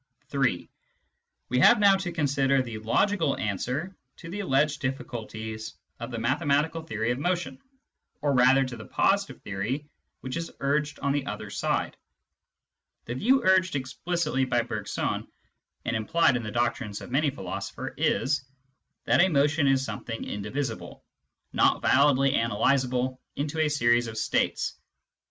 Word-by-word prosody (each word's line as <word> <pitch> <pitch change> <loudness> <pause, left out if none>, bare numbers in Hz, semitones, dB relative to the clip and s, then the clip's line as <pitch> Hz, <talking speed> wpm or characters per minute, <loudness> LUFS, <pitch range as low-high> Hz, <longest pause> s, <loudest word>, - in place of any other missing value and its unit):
(3) 130 -11 0 0.8
We 125 - +1
have - - +7
now 200 -2 +6
to 185 -2 -4
consider 140 -4 +2
the 115 -3 -6
logical 160 - +1
answer 125 - -3 0.2
to 165 -2 -9
the 205 - -4
alleged 150 -5 +1
difficulties 110 -4 -5 0.2
of 120 +1 -5
the 120 - -5
mathematical 145 +6 +1
theory 110 -7 -2
of 120 - -2
motion, 170 -5 -2 0.6
or 145 -1 +1
rather 130 +1 +5
to 130 -2 -6
the 110 - -9
positive 200 0 +1
theory 105 +9 -3 0.4
which 130 +4 -4
is 165 0 -4
urged 145 +1 0
on 140 - +1
the 140 -1 -1
other - - -5
side. - - -1 1.1
The 120 - -4
view 250 - +3
urged 185 -3 +3
explicitly 150 +2 -1
by 120 -2 +1
Bergson, - - -3 0.6
and - - -1
implied 130 +6 +3
in 125 - -1
the 110 - -5
doctrines 120 -2 -1
of - - -9
many 145 +3 +2
philosophers, 95 -7 -6
is, 140 0 +1 0.6
that - - +4
a 190 - +5
motion 145 -1 +2
is 135 0 +3
something 115 -3 -5
indivisible, 110 +4 -5 0.5
not - - +3
validly 135 0 +4
analysable 125 +2 +1 0.2
into 150 +2 -3
a 155 -1 +3
series 120 -4 +2
of 110 -1 -7
states. 110 - 0
135 Hz, 145 wpm, -27 LUFS, 120-150 Hz, 1.1 s, have